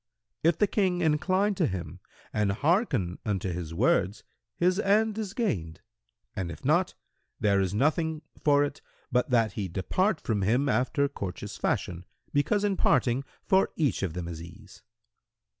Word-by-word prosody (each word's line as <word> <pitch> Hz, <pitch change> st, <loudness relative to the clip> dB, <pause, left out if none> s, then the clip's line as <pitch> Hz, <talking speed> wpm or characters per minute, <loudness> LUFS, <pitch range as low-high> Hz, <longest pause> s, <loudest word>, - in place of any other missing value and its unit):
If 165 Hz, 0 st, +3 dB
the 210 Hz, -, +4 dB
King 185 Hz, -3 st, +1 dB
incline 185 Hz, +6 st, +2 dB
to 180 Hz, -4 st, +1 dB
him 90 Hz, -3 st, -5 dB, 0.3 s
and 105 Hz, -2 st, +1 dB
hearken 140 Hz, -, +1 dB
unto 95 Hz, -3 st, -1 dB
his 85 Hz, -2 st, -5 dB
words, 100 Hz, +1 st, +1 dB, 0.3 s
his 180 Hz, +2 st, +2 dB
end 215 Hz, +2 st, +2 dB
is 205 Hz, -3 st, -4 dB
gained, 85 Hz, -, -2 dB, 0.5 s
and 95 Hz, -4 st, -3 dB
if -, -, -10 dB
not, -, -, +2 dB, 0.4 s
there 100 Hz, -2 st, +3 dB
is 95 Hz, -2 st, 0 dB
nothing 155 Hz, -, +1 dB, 0.2 s
for 145 Hz, -1 st, +5 dB
it 145 Hz, -1 st, -4 dB, 0.3 s
but 125 Hz, +1 st, +1 dB
that 115 Hz, -4 st, +3 dB
he 100 Hz, -2 st, -3 dB
depart 155 Hz, -, 0 dB
from 105 Hz, -3 st, -1 dB
him 120 Hz, +9 st, +2 dB
after 130 Hz, +4 st, +1 dB
courteous 100 Hz, -10 st, -6 dB
fashion, 90 Hz, 0 st, -2 dB, 0.3 s
because 200 Hz, +9 st, +2 dB
in 200 Hz, -2 st, +1 dB
parting 125 Hz, -2 st, +2 dB, 0.2 s
for 190 Hz, -1 st, +3 dB
each 145 Hz, -, 0 dB
of 95 Hz, -5 st, -2 dB
them 90 Hz, -1 st, -4 dB
is 85 Hz, -2 st, -6 dB
ease." 95 Hz, +4 st, -13 dB
125 Hz, 160 wpm, -28 LUFS, -, 0.5 s, for